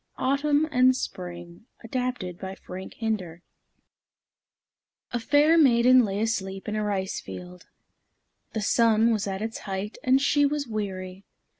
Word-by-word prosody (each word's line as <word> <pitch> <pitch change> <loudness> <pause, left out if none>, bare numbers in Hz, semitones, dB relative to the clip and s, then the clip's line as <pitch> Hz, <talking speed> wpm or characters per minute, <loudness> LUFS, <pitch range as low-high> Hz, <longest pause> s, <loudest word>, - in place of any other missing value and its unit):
AUTUMN 285 +3 +2
AND 255 -2 +4
SPRING 175 -3 -7 0.2
ADAPTED 240 -7 -3
BY 190 0 -6
FRANK 190 0 -9
HINDER 185 -7 -3 1.7
A 240 - 0
fair 295 +7 +4
maiden 250 -2 +6
lay 200 -2 -2
asleep 195 -4 -2
in 210 - -2
a 215 - -1
rice 195 -2 -2
field. 180 0 -10 0.9
The 220 - -2
sun 225 +1 +3
was 210 -2 -1
at 195 +1 -3
its 225 +1 -4
height, 195 +1 -5
and 260 +1 +4
she 290 +1 +2
was 290 0 0
weary. 195 -4 -5
215 Hz, 135 wpm, -26 LUFS, 190-255 Hz, 1.7 s, maiden